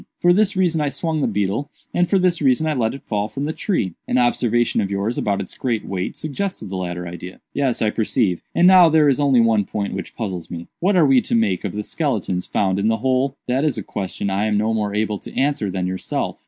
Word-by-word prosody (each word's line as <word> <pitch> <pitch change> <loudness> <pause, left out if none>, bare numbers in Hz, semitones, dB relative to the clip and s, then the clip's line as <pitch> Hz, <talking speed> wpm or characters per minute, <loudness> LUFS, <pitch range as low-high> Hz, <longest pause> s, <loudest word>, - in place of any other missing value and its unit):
For 175 0 +5
this 205 +1 +2
reason 175 -4 +1
I 145 - +1
swung 160 +1 -2
the - - +2
beetle, 105 +6 -1 0.2
and 175 0 +2
for 195 - +3
this 180 -3 +1
reason 135 +2 +3
I 155 - +1
let 120 -3 0
it 135 - -11
fall 105 -1 -2
it - - -22
from 140 +1 -3
the 155 - -2
tree. 130 - -1
An - - +1
observation 120 -2 +2
of 100 - -2
yours 100 +4 -1
about 100 -2 0
its 95 - -7
great 120 -4 -2
weight 95 -1 -4
suggested 155 - -4
the 95 - -5
latter 90 -1 -4
idea." 90 +2 -8
"Yes, 135 -5 0
I 105 - +2
perceive; 105 -5 0
and 175 - +4
now 180 -2 +8
there 155 -2 +4
is 135 - +1
only 135 -4 +4
one 115 -2 +3
point 100 +1 -4
which 95 - -6
puzzles 90 -7 -4
me. 85 -1 -6
What 190 +3 +2
are 170 -4 +5
we 135 -3 +5
to - - -1
make 105 -5 +1
of 100 - -3
the 105 0 -3
skeletons 105 - -2
found 95 -1 0
in 100 - +1
the 110 0 +2
hole?" 130 +1 +1
"That 130 +3 +1
is 150 -6 0
a 110 - -4
question 100 0 -4
I 100 +2 0
am 105 -1 +1
no 110 +2 +1
more 105 -2 -1
able 105 -1 -1
to - - -11
answer 140 -6 +1
than 95 -1 -2
yourself. 95 0 -3
115 Hz, 250 wpm, -21 LUFS, 100-145 Hz, 0.2 s, now